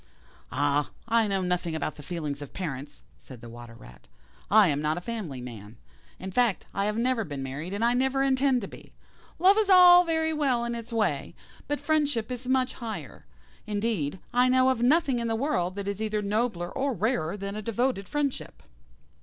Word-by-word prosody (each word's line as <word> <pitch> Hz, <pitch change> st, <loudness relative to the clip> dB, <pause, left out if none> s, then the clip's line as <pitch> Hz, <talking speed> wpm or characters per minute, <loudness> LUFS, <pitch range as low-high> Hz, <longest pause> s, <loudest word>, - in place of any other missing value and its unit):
"Ah! 145 Hz, +2 st, +1 dB, 0.2 s
I 230 Hz, -1 st, +3 dB
know 195 Hz, -2 st, 0 dB
nothing 180 Hz, -2 st, -1 dB
about 155 Hz, 0 st, -2 dB
the 150 Hz, -, -12 dB
feelings 145 Hz, -2 st, -5 dB
of 145 Hz, -, -9 dB
parents," 145 Hz, -5 st, -6 dB
said 130 Hz, -3 st, -13 dB
the 120 Hz, 0 st, -11 dB
Water 120 Hz, 0 st, -11 dB
rat; -, -, -16 dB, 0.4 s
"I 210 Hz, -1 st, +6 dB
am 145 Hz, 0 st, 0 dB
not 155 Hz, +2 st, 0 dB
a -, -, -1 dB
family 180 Hz, -, -5 dB
man. 110 Hz, -3 st, -10 dB, 0.4 s
In 190 Hz, +1 st, -7 dB
fact, 235 Hz, -1 st, +1 dB
I 200 Hz, -, 0 dB
have 210 Hz, +1 st, -1 dB
never 240 Hz, -1 st, +1 dB
been 145 Hz, -6 st, -6 dB
married, 140 Hz, +7 st, -5 dB
and 205 Hz, +3 st, 0 dB
I 240 Hz, -, +3 dB
never 265 Hz, +2 st, +1 dB
intend 265 Hz, -1 st, +2 dB
to 200 Hz, -, -5 dB
be. -, -, -14 dB, 0.4 s
Love 385 Hz, +5 st, +5 dB
is 425 Hz, -2 st, +1 dB
all 360 Hz, -1 st, +9 dB
very 320 Hz, -1 st, 0 dB
well 265 Hz, -6 st, +1 dB
in 235 Hz, -, -3 dB
its 235 Hz, 0 st, -7 dB
way, 205 Hz, -12 st, -1 dB, 0.3 s
but 290 Hz, 0 st, -1 dB
friendship 290 Hz, -6 st, 0 dB
is 250 Hz, 0 st, -6 dB
much 260 Hz, 0 st, +1 dB
higher. 205 Hz, -, -7 dB, 0.4 s
Indeed, 205 Hz, -7 st, -1 dB, 0.2 s
I 250 Hz, +1 st, +4 dB
know 255 Hz, 0 st, +4 dB
of 255 Hz, -3 st, 0 dB
nothing 275 Hz, 0 st, +3 dB
in 235 Hz, -, -2 dB
the 225 Hz, -, 0 dB
world 225 Hz, -, -1 dB
that 200 Hz, -1 st, -5 dB
is 200 Hz, +1 st, -3 dB
either 215 Hz, -1 st, -1 dB
nobler 200 Hz, -4 st, -1 dB
or 275 Hz, 0 st, -1 dB
rarer 200 Hz, -4 st, -1 dB
than 200 Hz, 0 st, -5 dB
a 215 Hz, -, -4 dB
devoted 230 Hz, -2 st, -1 dB
friendship." 290 Hz, -2 st, -3 dB
215 Hz, 195 wpm, -27 LUFS, 165-255 Hz, 0.4 s, all